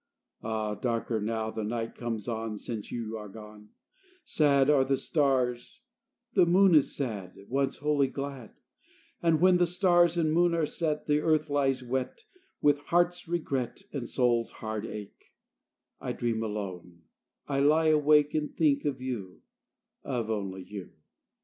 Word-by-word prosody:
Ah! 110 -1 -2
darker 115 0 -2
now 110 +1 -2
the 110 - -4
night 115 +1 -3
comes 115 -2 -4
on 110 -2 -3
Since 110 -1 -6
you 115 -2 -4
are 105 -1 -8
gone; 105 0 -12 0.5
Sad 140 -3 +3
are 145 -3 +5
the 135 0 +1
stars, 130 - 0 0.5
the 180 -3 +5
moon 185 +1 +5
is 150 -3 +4
sad, 105 -9 -4
Once 135 +1 0
wholly 145 -1 +2
glad; 135 -3 -7 0.7
And 165 -2 +3
when 185 0 +5
the 175 0 +3
stars 175 -1 +3
and 155 -2 +2
moon 175 0 +3
are 165 -2 +1
set, 150 -1 -2
And 150 0 +3
earth 155 -1 +1
lies 135 -2 +1
wet, 130 - -3 0.4
With 145 -1 +4
heart's 175 0 +1
regret 140 -8 -2
and 130 -5 -4
soul's 120 -2 +1
hard 110 0 -5
ache, 105 -2 -10 0.6
I - - -4
dream 115 -2 -1
alone, 95 -6 -6 0.4
I 140 -1 0
lie 155 +3 +4
awake, 150 -1 +4
And 150 -1 -1
think 145 -3 +1
of 135 -3 -2
you, 110 -8 -6 0.6
Of 120 -4 -2
only 95 -3 -3
you. 95 0 -9
130 Hz, 150 wpm, -29 LUFS, 110-150 Hz, 0.7 s, are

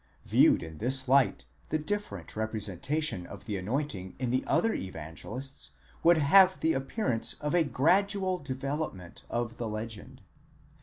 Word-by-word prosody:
Viewed - - +4
in 80 -1 -9
this 130 +3 +2
light 135 0 +3 0.2
the 155 - +1
different 155 - -4
representation 110 - -1
of 100 0 -10
the 105 - -3
anointing 100 -1 -3
in 125 -2 -2
the 130 - +1
other 225 -1 +2
Evangelists 95 - -7 0.3
would 170 0 +6
have 185 +6 +6
the 160 0 +2
appearance 135 - 0
of 150 0 -3
a 175 -1 +5
gradual 185 +6 +2
development 135 - -5
of 120 0 -3
the 115 -2 -3
legend. 110 0 -7
130 Hz, 140 wpm, -29 LUFS, 105-155 Hz, 0.3 s, would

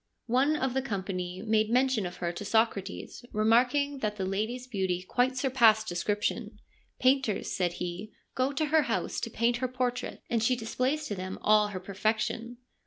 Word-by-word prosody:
One 265 +6 +2
of 265 -4 -1
the 265 - +1
company 190 -5 -4
made 215 -1 +2
mention 250 -4 +2
of 175 - -8
her 170 -1 -2
to 175 - -7
Socrates, 210 0 -1
remarking 250 +6 +2
that 215 -3 -1
the 190 -2 -3
lady's 220 +6 -2
beauty 190 -6 -1
quite 255 +1 +1
surpassed 235 -5 +4
description. 205 +4 -2 0.2
' - - -39
Painters,' 260 -5 +2
said 175 -2 0
he, 180 +4 -5
' - - -47
go 260 +2 +1
to 285 +2 0
her 310 +1 +4
house - - -1
to - - -3
paint 235 +1 +1
her 255 +1 -1
portrait, 250 -1 -3
and 235 -2 0
she 250 +3 +3
displays 255 +6 -1
to 215 - -3
them 185 -1 -5
all 210 0 +5
her 200 -3 -5
perfection 220 +5 -2
225 Hz, 180 wpm, -29 LUFS, 200-255 Hz, 0.2 s, all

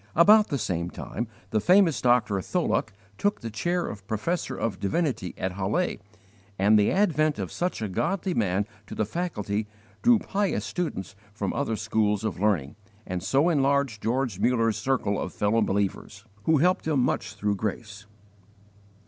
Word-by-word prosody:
About 210 +6 +7
the 140 - -1
same 90 -7 -2
time 115 +5 -5 0.2
the 110 - +2
famous 175 - +4
Dr. 120 -5 +3
Tholuck 165 - 0 0.3
took 205 0 +1
the 115 - -5
chair 175 +11 -1
of 100 -1 -8
professor 120 - -2
of 115 - -2
divinity 115 - -1
at 95 - -2
Halle, 100 - -1 0.6
and 105 +3 +5
the 105 - +3
advent 155 -6 +2
of 95 -4 -4
such 175 -10 -2
a - - -1
godly 185 - -1
man 100 - +1 0.2
to - - -7
the 110 - 0
faculty 105 - -3 0.3
drew 240 -1 +6
pious 195 - -1
students 105 - -4 0.2
from 110 - -2
other 140 -6 -1
schools 105 -1 0
of 110 -5 -3
learning, 90 -9 0 0.3
and 90 -1 -3
so 135 - +2
enlarged 140 -7 +1
George 120 -4 -1
Mullers 115 -1 +2
circle 110 -3 0
of 90 - -4
fellow 105 +2 +2
believers, 100 +1 -2 0.2
who 160 - +4
helped 180 +3 +2
him 150 -4 +2
much 110 -4 -1
through 105 0 0
grace. 105 0 -5
110 Hz, 160 wpm, -26 LUFS, 100-155 Hz, 0.6 s, About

